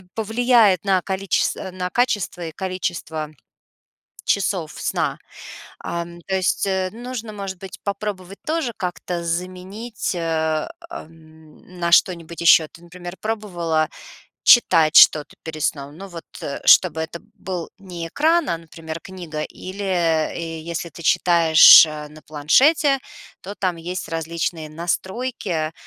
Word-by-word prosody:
повлияет 225 -3 +3
на 190 -2 +2
количес 190 0 0
на 185 -1 -5
качество 210 -6 -1
и - - -6
количество 175 -5 -4 1.0
часов 185 -5 0
сна. - - -1 0.6
Ам, 170 0 -6
то 190 - 0
есть, 190 +1 0
э, 190 -1 -1
нужно, 235 -1 -7
может 195 -2 -6
быть, 190 -1 -9
попробовать 200 -2 -5
тоже 315 -5 -1
как-то 180 -2 -4
заменить, 185 +6 -4
э, 160 -2 -1 0.2
эм, 160 - -13
на 170 0 -1
что-нибудь 170 -1 +2
ещё. 165 -2 +6
Ты, 170 - -17
например, 175 +1 -9
пробовала 175 -8 -1 0.6
читать 165 -9 +6
что-то 150 -1 +6
перед 155 -2 -7
сном? 145 0 -2
Ну, 195 +3 -9
вот, 170 -3 -9 0.2
э, 140 - -5
чтобы 160 -4 +6
это 165 +1 -5 0.2
был 180 -3 -5
не 175 -4 -7
экран, 320 - +2
а, 170 - -1
например, 165 0 -9
книга 175 -5 -7
или, 190 +5 -8
э, 165 -2 -1
если 170 +1 -5
ты 170 - -11
читаешь 165 -1 +7
на 150 0 -9
планшете, 270 - +3 0.4
то 200 +3 -8
там 185 -3 -1
есть 175 +3 -5
различные 165 -1 -3
настройки, 175 0 -3
175 Hz, 130 wpm, -21 LUFS, 160-195 Hz, 1.0 s, читаешь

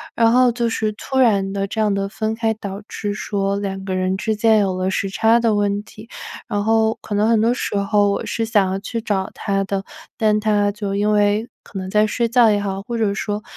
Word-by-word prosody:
然 230 -1 +4
后 250 0 +5
就 235 -1 0
是 215 -1 -1
突 265 +5 -5
然 200 -6 +3
地 195 0 -2
这 220 +2 -2
样 210 -2 +2
的 195 0 -1
分 220 +2 -3
开， 225 -1 0
导 200 -1 -7
致 205 -1 -4
说 200 -1 -2
两 195 -1 -4
个 190 -1 -3
人 185 0 0
之 220 +2 -1
间 220 -1 +4
有 190 -2 0
了 185 +1 0
时 195 +1 -1
差 225 +3 +3
的 225 -2 +2
问 205 0 0
题。 220 +1 -14 0.4
然 205 -3 -1
后 220 0 +2
可 210 - -6
能 210 +2 +2
很 225 -2 +3
多 235 +2 +3
时 225 - -3
候 205 0 +2
我 - - -2
是 225 - -2
想 205 -4 +2
要 190 - -2
去 230 +3 -4
找 195 -4 -1
他 195 -2 -1
的， 195 0 -2 0.3
但 215 -2 +2
他 205 -1 +1
就 200 -1 -4
因 210 +1 +1
为 210 +2 +2
可 200 - -10
能 185 0 -5
在 210 +2 +3
睡 235 +2 -1
觉 235 -2 +5
也 205 -1 +2
好， 195 -1 -3
或 235 +1 -4
者 210 -3 +1
说， 210 +1 -3
210 Hz, 255 characters per minute, -20 LUFS, 200-225 Hz, 0.4 s, 后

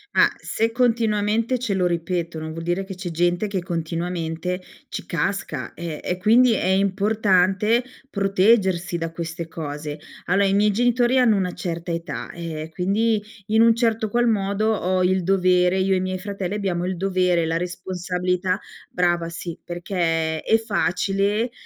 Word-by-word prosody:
Ah, - - +5
se 225 +1 -1
continuamente 230 0 +1
ce 225 -5 -1
lo 185 -1 +1
ripetono, 170 -2 -2
vuol 165 +1 -6
dire 175 +3 -1
che 190 0 -7
c'è 180 -2 -5
gente 175 +4 +1
che 195 -3 -2
continuamente 170 +1 -3 0.3
ci - - -6
casca. 165 -5 -2
E 170 -3 -5
e 180 - -2
quindi 230 +5 +5
è 215 - -1
importante 200 +2 +2 0.3
proteggersi 195 -4 +2
da 165 -1 -3
queste 170 0 -5
cose. 150 -2 -6 0.3
Allora, 195 +3 +3
i 195 - +1
miei 210 +1 +4
genitori 245 +3 +2
hanno 235 -4 +4
una 185 -2 -1
certa 170 0 -4
età, 170 +1 -4
eh, 160 -2 -6
quindi 210 +5 +1 0.3
in 220 +1 +3
un 230 0 +6
certo 225 -2 +1
qual 240 +3 +2
modo, 210 0 +1
ho 185 -2 0
il 185 +1 +2
dovere 185 -1 +3
io 190 0 +2
e - - +3
i - - 0
miei 185 0 -2
fratelli, 195 0 -4
abbiamo 180 -4 -1
il 185 0 -2
dovere, 180 -2 +1
la 165 +1 0
responsabilità 180 +1 -2 0.3
brava 175 -2 +1
sì, 170 0 -7
perché 165 -3 -1
è 225 - +3
facile 205 +1 0
185 Hz, 160 wpm, -23 LUFS, 175-210 Hz, 0.3 s, un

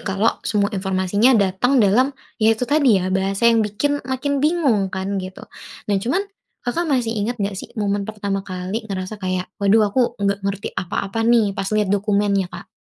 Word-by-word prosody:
kalau 200 +3 0
semua 205 0 0
informasinya 195 +5 +2
datang 200 +7 +2
dalam, 230 +7 +4 0.3
ya, 220 0 +4
itu 250 - -1
tadi 275 -4 +3
ya, 185 0 -1
bahasa 195 +3 0
yang 230 - +3
bikin 285 +8 -1
makin 275 +2 -1
bingung 280 - +2
kan, 190 +1 -3
gitu. 185 0 -8 0.4
Nah, 205 - 0
cuman 265 - 0 0.4
Kakak 325 +7 -1
masih 235 -4 +1
inget 225 +4 -1
nggak 200 -1 -2
sih - - -7
momen 205 -1 -1
pertama 200 -2 -3
kali 185 +4 -4
ngerasa 195 0 -5
kayak, 185 -2 -3
"Waduh, 210 +2 +4
aku 260 - +2 0.2
nggak 200 0 0
ngerti 200 0 -2
apa-apa, 200 +5 -2
nih", 230 -4 +3
pas - - -2
liat 210 -2 +1
dokumennya, 200 -1 +1
Kak? - - -9
205 Hz, 180 wpm, -21 LUFS, 195-230 Hz, 0.4 s, dalam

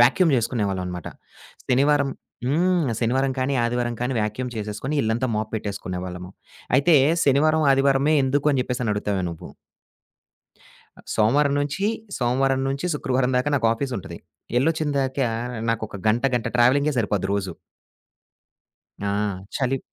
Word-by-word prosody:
Vacuum 155 +8 +5
చేసుకునేవాళ్ళమనమాట. 95 -7 -2 0.6
శనివారం 140 +2 +3 0.4
హ్మ్. 170 +2 +2
శనివారం 130 +3 +1
కానీ, 130 +2 0
ఆదివారం 120 0 -1
కానీ 125 +2 -1
వాక్యూమ్ 110 +4 -3
చేసేసుకొని 105 +7 -4
ఇళ్ళంతా 115 +4 0
మాప్ 110 0 -2
పెట్టేసుకునేవాళ్ళము. 90 -3 -5 0.5
అయితే 155 +5 +4 0.3
శనివారం, 155 +3 +3
ఆదివారమే 135 +2 +3
ఎందుకు 145 +3 +1
అని 130 - +1
చెప్పేసని 125 -4 -2
అడుగుతావేమో! 100 -2 -1
నువ్వు. 85 - -9 1.5
ఆహ్, - - -17
సోమవారం 140 +7 +3
నుంచి 145 +8 -1 0.3
సోమవారం 130 +2 +1
నుంచి 140 +6 -2
శుక్రవారం 130 -2 0
దాకా 130 +3 +1
నాకాఫీసుంటది. 115 -7 -1 0.4
ఎళ్ళొచ్చిందాకా 140 -4 0 0.4
నాకొక 110 -2 -3
గంట 120 +4 +1
గంట 120 - -1
ట్రావెలింగే 140 +5 +4
సరిపోద్ది 100 -3 0
రోజు. 95 -3 -2 1.5
ఆ! - - 0 0.5
చలి. 135 0 0
130 Hz, 115 wpm, -23 LUFS, 110-140 Hz, 1.5 s, వాక్యూమ్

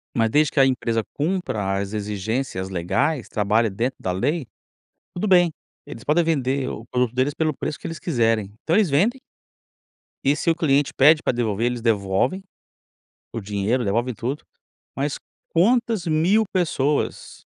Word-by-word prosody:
Mas 115 -1 +2
desde 150 +4 +3
que 140 - +2
a 135 - +7
empresa 115 -3 0
cumpra 140 - -1
as 100 +1 -4
exigências 105 0 -3
legais, 120 - -1
trabalha 110 +2 +1
dentro 120 +7 -2
da 90 - -1
lei, 135 - -1 0.7
tudo 195 +4 -2
bem. 175 -3 +5 0.3
Eles 115 - -9
podem 165 +3 +3
vender 135 -4 0
o 115 - -7
produto 125 -1 -1
deles 130 +3 +1
pelo 155 0 0
preço 150 - -4
que - - -8
eles 165 -1 -5
quiserem 115 - 0
então 165 - +1
eles 205 -6 +3
vendem 210 - +2 1.1
e 140 +2 +3
se 165 - +1
o - - +3
cliente 145 -4 +1
pede 150 +3 +6
pra - - +1
devolver, 115 -2 -1
eles 120 -1 -2
devolvem 110 - 0 0.9
o 115 - -4
dinheiro, 105 +5 -1
devolvem 115 +5 0
tudo. 130 +7 -4 0.5
Mas 140 +2 -2 0.3
quantas 225 +1 +2
mil 170 +8 +3
pessoas 150 -6 -1
130 Hz, 155 wpm, -23 LUFS, 110-160 Hz, 1.1 s, a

